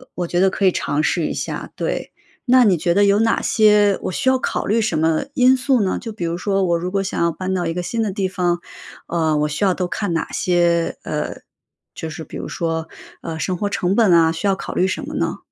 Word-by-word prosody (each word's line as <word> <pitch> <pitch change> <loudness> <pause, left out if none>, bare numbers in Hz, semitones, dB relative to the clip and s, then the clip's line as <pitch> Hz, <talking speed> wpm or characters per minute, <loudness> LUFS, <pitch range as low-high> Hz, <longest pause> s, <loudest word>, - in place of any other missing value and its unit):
我 175 - -2
觉 175 +1 0
得 190 - +5
可 195 - -1
以 185 - +5
尝 145 +2 -1
试 160 +1 0
一 - - -3
下， - - -5
对， - - -3 0.3
那 255 -1 +5
你 195 -4 +4
觉 170 +2 +1
得 205 +3 +4
有 200 +1 +4
哪 225 +1 +2
些 210 -2 +4
我 - - -3
需 260 - -3
要 260 0 +5
考 - - -2
虑 225 +3 +2
什 215 -8 0
么 160 +4 +1
因 255 0 +5
素 260 0 +1
呢？ 190 - 0
就 225 - -6
比 210 -5 -5
如 170 +1 -2
说 195 0 0
我 170 -1 +2
如 180 +2 -4
果 195 0 0
想 190 - -3
要 170 0 +2
搬 185 +3 -4
到 180 -2 -1
一 165 - -1
个 180 - -3
新 225 +6 -2
的 210 - -1
地 190 0 -1
方， 180 -2 -1 0.5
呃， 160 -3 0
我 150 - +1
需 150 +7 -3
要 190 -2 +3
都 180 -1 -2
看 200 0 -3
哪 165 - -2
些 170 -2 +1
呃， - - -3 0.6
就 160 - -5
是 160 +1 -7
比 - - -11
如， - - -5
说， 165 -1 -3 0.3
呃， 160 -1 -5
生 185 +3 -1
活 205 +3 -2
成 190 -1 0
本 220 -5 +4
啊， 165 -1 +5
需 165 +5 -2
要 195 - +3
考 190 - -6
虑 185 - +2
什 190 - -2
么 - - -6
呢？ - - -1
185 Hz, 275 characters per minute, -20 LUFS, 170-205 Hz, 0.6 s, 得